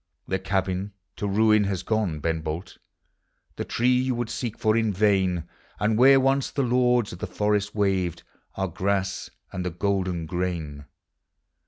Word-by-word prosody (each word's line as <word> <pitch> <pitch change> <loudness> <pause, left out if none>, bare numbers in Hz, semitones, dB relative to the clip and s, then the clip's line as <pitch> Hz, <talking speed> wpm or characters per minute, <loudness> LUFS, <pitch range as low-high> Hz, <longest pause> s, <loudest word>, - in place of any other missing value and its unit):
The 95 - -1
cabin 95 +1 -1 0.2
to 105 - -2
ruin 110 +1 +4
has 95 -2 -2
gone, 105 -9 -1
Ben 80 +1 -1
Bolt, 80 +3 -5 0.8
The - - -3
tree 125 +2 +1
vou 125 - +1
would 120 -1 -3
seek 120 -4 -4
for 110 -1 +2
in 110 -2 +2
vain; 95 -4 +1 0.3
And 105 +2 +2
where 135 +4 +7
once 135 0 +2
the 140 - -1
lords 125 -3 +2
of 90 - -9
the - - -3
forest 105 -1 0
waved 95 -5 0 0.3
Are 95 0 -1
grass 95 +2 -1 0.2
and 90 - -4
the 90 - -1
golden 90 -1 -1
grain. 80 -4 -3
100 Hz, 160 wpm, -25 LUFS, 90-110 Hz, 0.8 s, where